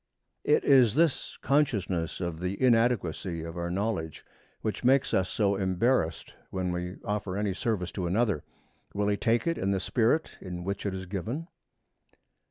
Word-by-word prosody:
It 150 - +3
is 130 -5 +5
this 160 -2 +1
consciousness 100 - +1
of 85 -3 -3
the 90 +2 -3
inadequacy 115 -9 +2
of 80 0 -7
our 85 0 -3
knowledge 90 -4 -2 0.4
which 110 +2 -2
makes 130 +2 +3
us 95 0 +2
so 100 -1 +1
embarrassed 95 -2 0 0.2
when 95 -1 -2
we 90 +1 -4
offer 100 -2 -2
any 105 -2 0
service 95 -3 -2
to 90 -2 -3
another. 100 -4 +1 0.5
Will 105 0 +1
he 105 - +2
take 115 +3 +1
it 165 0 0
in 95 - 0
the 100 -1 +1
spirit 120 - +1
in 90 -1 -6
which 100 +2 -3
it 95 - -2
is 95 0 -5
given? 110 - -4
100 Hz, 165 wpm, -28 LUFS, 90-115 Hz, 0.5 s, is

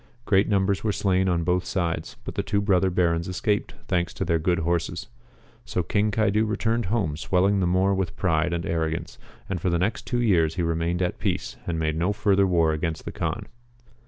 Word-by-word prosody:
Great 100 0 +3
numbers 100 -1 +1
were 110 - +1
slain 95 -1 +1
on 85 -2 +1
both 90 +1 +1
sides, 85 -4 -2
but - - -5
the - - -1
two 100 +1 0
brother 95 -2 +2
Barons 85 -2 +1
escaped, 105 +3 -1
thanks 85 -2 0
to 95 - -2
their 85 -1 +1
good 85 +2 +1
horses. 85 +3 -2 0.5
So 90 - -2
King 105 +5 +1
Caidu 110 0 +2
returned 115 +1 0
home 95 -7 0
swelling 95 +5 +2
the 90 - +1
more 95 +2 +2
with 95 -3 -2
pride 85 -2 +1
and 85 -1 -2
arrogance, 80 -1 -2 0.3
and 90 -4 -3
for 90 - +1
the 85 - +1
next 95 +6 -1
two 120 - 0
years 85 -9 +2
he 90 - -1
remained 85 +2 0
at 90 - -2
peace, - - -2
and 85 -2 -1
made 80 -1 0
no 90 +5 +1
further 100 -1 +3
war 85 -3 +3
against 80 +1 -3
the - - -4
Kaan. - - -3
90 Hz, 205 wpm, -25 LUFS, 85-100 Hz, 0.5 s, Great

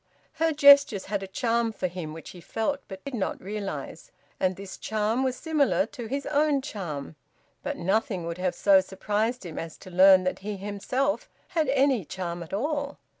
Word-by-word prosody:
Her 325 0 +4
gestures 280 -8 +6
had 200 0 -2
a 195 - -5
charm 230 +3 0
for 205 - -4
him 175 -3 -4
which 160 +1 -9
he 180 - -12
felt 225 +10 -2
but 190 -1 -10
did 280 - -5
not 215 -6 -2
realise. 205 - -6 0.3
And 185 0 +1
this 195 0 -9
charm 220 +4 0
was 260 -1 0
similar 295 -1 +1
to 240 -3 -8
his 275 +4 -3
own 295 -2 +2
charm. 170 - -5 0.5
But - - -4
nothing 190 0 0
would 170 +1 -5
have 185 -1 0
so 195 -2 +5
surprised 210 +4 -2
him 165 - -6
as 165 -1 -7
to 185 - -12
learn 185 +1 +7
that 185 - -1
he 205 +1 -5
himself 205 +9 -2 0.2
had 320 -5 0
any 270 -5 +3
charm 175 +1 -5
at 165 - -9
all. 285 +6 -2
210 Hz, 185 wpm, -27 LUFS, 185-270 Hz, 0.5 s, learn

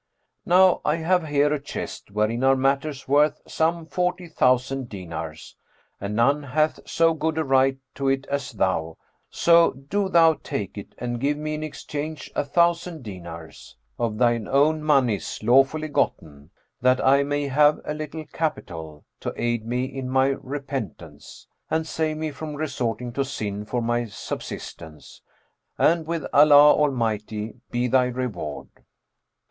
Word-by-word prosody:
Now 185 0 +5
I 150 - +2
have 170 0 +1
here 145 0 +2
a 150 - -2
chest, 145 - -7
wherein 110 +4 0
are 135 0 +5
matters 135 +1 -1
worth 145 +3 +3
some 165 +1 0
forty 180 +1 -2
thousand 130 -3 +1
dinars; 85 -5 -7 0.4
and 100 +1 -4
none 140 +6 +3
hath 155 +3 0
so 165 0 +3
good 160 0 -2
a 160 - +1
right 135 -1 +3 0.2
to 140 - -3
it 135 0 +1
as 140 -3 -3
thou; 90 -6 -1 0.3
so 170 0 +5
do 190 +10 -2
thou 165 -3 +5
take 100 -3 -4
it 100 - -9
and 120 -1 -3
give 145 +3 0
me 155 0 -3
in 155 - -4
exchange 155 0 -6
a - - +1
thousand 170 +1 +1
dinars, 85 - -10 0.2
of 110 -2 -1
thine 120 -2 +2
own 150 +3 +3
monies 135 -9 +1
lawfully 135 +6 +3
gotten, 75 - -2 0.3
that 130 +1 +4
I 140 +1 +5
may 145 0 -1
have 150 +2 +4
a 150 - -2
little 155 +1 -6
capital, 80 - -5
to - - -4
aid 120 -1 -1
me 125 +2 -1
in 130 -1 -6
my 130 +1 +3
repentance,[FN#408] 135 - -6 0.3
and 160 - -4
save 155 0 -2
me 155 0 -3
from 150 +1 -7
resorting 125 -5 -3
to 140 - 0
sin 105 -6 -4
for 120 +2 -2
my 120 +1 0
subsistence; 80 -6 -8 0.6
and 165 -1 +2
with 165 -2 -2
Allah 145 0 +8
Almighty 110 -6 -1 0.2
be 120 +1 0
thy 125 +1 +3
reward!" 120 - -4
135 Hz, 150 wpm, -24 LUFS, 115-155 Hz, 0.6 s, Allah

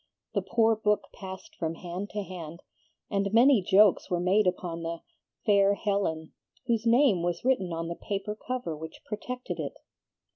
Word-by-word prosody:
The - - +1
poor 225 -1 +3
book 210 -1 0
passed 195 +12 -9
from 165 - -3
hand 180 +4 -6
to 205 -1 -3
hand, 170 -3 -8 0.5
and 200 -1 0
many 240 +1 +6
jokes 200 +2 +4
were 175 - 0
made 190 +3 +3
upon 175 -2 -2
the 165 0 -4 0.4
'fair 200 -1 +4
Helen' 195 -7 -1 0.3
whose 230 -2 0
name 235 -6 +5
was 175 +4 -2
written 220 -9 +2
on 165 0 -3
the 170 - -3
paper 200 +3 -4
cover 245 -8 -4
which 160 +1 -9
projected 250 +4 -5
it. - - -4
195 Hz, 160 wpm, -28 LUFS, 175-220 Hz, 0.5 s, many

